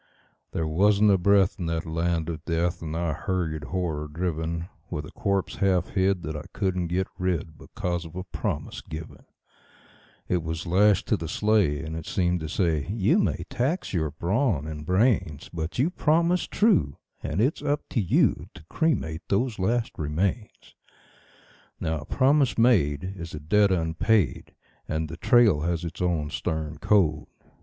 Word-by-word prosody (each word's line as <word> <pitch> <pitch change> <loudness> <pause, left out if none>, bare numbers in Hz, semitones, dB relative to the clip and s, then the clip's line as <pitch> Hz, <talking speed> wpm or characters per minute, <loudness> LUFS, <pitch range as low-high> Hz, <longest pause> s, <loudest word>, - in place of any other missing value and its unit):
There 80 - -2
wasn't 100 +6 +4
a 95 - +5
breath 100 0 +3
in 85 - -2
that 80 0 -2
land 85 0 -1
of 85 -1 -5
death, 85 0 -1
and 80 0 -4
I 85 -2 -1
hurried, 80 -4 -2
horror 80 -3 -2
driven, 85 +1 -3 0.2
With 75 -3 -4
a - - -11
corpse 100 -5 -1
half 95 -3 +2
hid 95 -2 +1
that 80 0 -4
I 75 +1 -6
couldn't 95 -3 -1
get 90 +3 0
rid, 85 -4 -1
because 85 +2 -4
of 80 -1 -11
a 90 - -4
promise 90 - -4
given; 80 0 -9 1.0
It 90 -1 +1
was 80 +1 -4
lashed 100 +3 +3
to - - +3
the 80 - -5
sleigh, 95 -6 +2
and 80 0 -5
it 80 - -6
seemed 90 -1 +1
to 80 -1 -5
say: 80 -4 0
"You 110 - +2
may - - 0
tax 140 - -1
your 80 -4 0
brawn 85 - 0
and 75 -1 -7
brains, 90 - +1
But 80 0 -4
you 140 +8 +2
promised 170 +2 +2
true, 190 - +2 0.2
and 80 +4 -3
it's 130 +8 +1
up 145 0 -1
to 120 - +1
you 95 - +2
to - - -13
cremate 85 - 0
those 110 +2 0
last 115 +5 0
remains." 90 +9 -2 1.1
Now 80 -1 -1
a 75 - -9
promise 135 - +2
made 90 - +3
is 85 -3 -7
a - - -5
debt 100 +7 +3
unpaid, 85 - +1 0.3
and 80 0 -2
the 85 - -7
trail 110 -5 +4
has 85 +1 -1
its 85 +1 -6
own 80 -4 0
stern 80 -3 -3
code. 80 -6 +2
85 Hz, 165 wpm, -26 LUFS, 80-100 Hz, 1.1 s, a